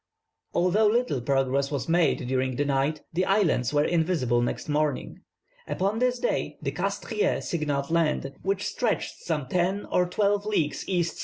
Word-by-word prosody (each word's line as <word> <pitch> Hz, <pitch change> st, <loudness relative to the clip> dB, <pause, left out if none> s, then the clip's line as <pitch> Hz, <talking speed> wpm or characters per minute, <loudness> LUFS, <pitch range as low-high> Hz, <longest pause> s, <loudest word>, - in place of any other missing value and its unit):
"Although 190 Hz, +5 st, +3 dB
little 230 Hz, -, +1 dB
progress 135 Hz, +1 st, +1 dB
was 140 Hz, -3 st, -3 dB
made 165 Hz, -4 st, +2 dB
during 130 Hz, 0 st, 0 dB
the 145 Hz, -, 0 dB
night, 140 Hz, +2 st, 0 dB
the 180 Hz, +3 st, +1 dB
islands 185 Hz, -, +2 dB
were 145 Hz, 0 st, +3 dB
invisible 160 Hz, -9 st, +1 dB
next 120 Hz, -, -2 dB
morning. 150 Hz, -2 st, -1 dB, 0.5 s
Upon 200 Hz, +4 st, -1 dB
this 250 Hz, 0 st, +2 dB
day -, -, -1 dB
the -, -, -3 dB
Castries 425 Hz, -, -1 dB
signalled 145 Hz, -3 st, -1 dB
land, 155 Hz, -4 st, +1 dB
which 195 Hz, +1 st, -1 dB
stretched 235 Hz, -4 st, -1 dB
some 155 Hz, -5 st, -2 dB
ten 180 Hz, +6 st, 0 dB
or 180 Hz, 0 st, +3 dB
twelve 205 Hz, +1 st, +1 dB
leagues 165 Hz, -8 st, -1 dB
E.S. 175 Hz, -3 st, 0 dB
165 Hz, 155 wpm, -26 LUFS, 140-195 Hz, 0.5 s, Although